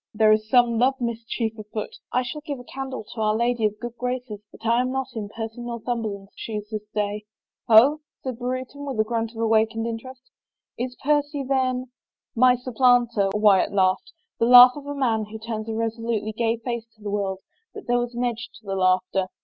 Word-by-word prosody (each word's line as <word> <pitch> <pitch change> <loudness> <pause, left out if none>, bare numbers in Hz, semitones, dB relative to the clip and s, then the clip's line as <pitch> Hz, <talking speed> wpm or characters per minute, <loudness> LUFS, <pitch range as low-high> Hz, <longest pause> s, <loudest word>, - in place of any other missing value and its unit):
" - - -69
There 215 0 +5
is 215 0 +2
some 240 -2 +4
love 260 +2 +3
mischief 230 -1 -2
afoot 215 0 -6
— - - -67
I 255 - +1
shall 300 +5 -6
give 290 -2 -5
a - - -10
candle 265 -1 -6
to 225 - -5
Our 215 0 +2
Lady 235 0 +1
of 210 - -5
GoocJ 240 +1 -8 0.2
Chances 210 -4 -8
that - - -15
I 235 +2 +3
am 255 0 -1
not 265 -1 -2
in 210 -2 -4
Percy 225 +1 -6
of 240 - -6
Northumberland's 225 -4 -4
shoes 210 -2 -5
this 210 -1 -5
day." 210 0 -2 0.2
" - - -66
Ho! 250 +7 +7
" - - -57
said 255 -3 -4
Brereton 255 +3 -4
with 270 -5 -4
a - - +5
grunt 225 0 -2
of 225 - -15
awakened 225 0 +2
inter 230 +2 -5
est. 260 -1 -14 0.3
" - - -65
Is 250 -1 -10
Percy 290 0 +1
then 255 -1 0
— - - -69
" - - -69
" - - -63
My 250 0 +6
supplanter! 245 -4 +2
" - - -7
Wyatt 205 -2 +4
laughed 185 -1 +1
— - - -59
the 230 - +3
laugh 250 0 +10
of 285 -1 -9
a 285 - -4
man 230 -6 +1
who 215 +1 -8
turns 220 0 -5
a 220 - -2
resolutely 225 -1 -2
gay 225 +1 0
face 235 -1 -4
to 215 - -20
the 205 - -3
world, 195 -2 -2 0.3
but - - -8
there 245 0 +2
was 240 0 -3
an 240 - -1
edge 235 -2 -2
to 220 - -17
the 195 -1 -3
laughter. 185 0 +1
230 Hz, 240 wpm, -24 LUFS, 215-250 Hz, 0.3 s, laugh